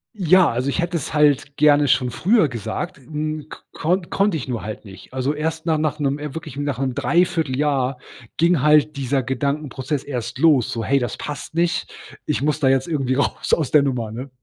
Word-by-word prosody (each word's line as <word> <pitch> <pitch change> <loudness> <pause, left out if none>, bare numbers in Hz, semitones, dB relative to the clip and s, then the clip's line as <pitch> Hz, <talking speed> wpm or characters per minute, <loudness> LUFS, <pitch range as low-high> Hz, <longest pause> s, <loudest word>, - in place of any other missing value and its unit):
Ja, 185 -2 +5
also, 125 +4 -1
ich - - -1
hätte 170 0 -1
es 155 - -5
halt 145 -1 +2
gerne 145 -1 +5
schon 125 -1 +2
früher 195 - +3
gesagt, 135 - -5
hm, 150 +2 -5 0.2
konn 175 +2 -1
konnte 200 -4 +2
ich 135 - -6
nur 120 -3 -3
halt 110 +1 -7
nicht. 95 -2 -13
Also, 130 +2 -1
erst 160 +2 -3
na 160 -2 +1
nach 150 -1 -1
'nem, 140 -1 -1
äh 150 -1 -6
wirklich, 155 -4 -7
nach 145 -2 -2
'm 130 -1 -1
3/4 165 -4 +1
Jahr 135 -3 0 0.4
ging 170 -2 +3
halt 150 +1 +4
dieser 135 -1 -1
Gedankenprozess 140 +1 -2
erst 125 -5 -5
los, 150 -8 +3
so: 115 - -3
„Hey, 140 0 +3
das 120 -4 -3
passt 150 +1 -7
nicht. 170 0 0 0.4
Ich 150 -2 -1
muss 150 +1 +1
da 140 - +2
jetzt 135 +3 +2
irgendwie 135 -5 0
raus 140 - -1
aus 155 -6 +1
der 150 - +6
Nummer.“, 125 -6 -2
ne? 125 +5 -7
145 Hz, 205 wpm, -21 LUFS, 130-155 Hz, 0.4 s, der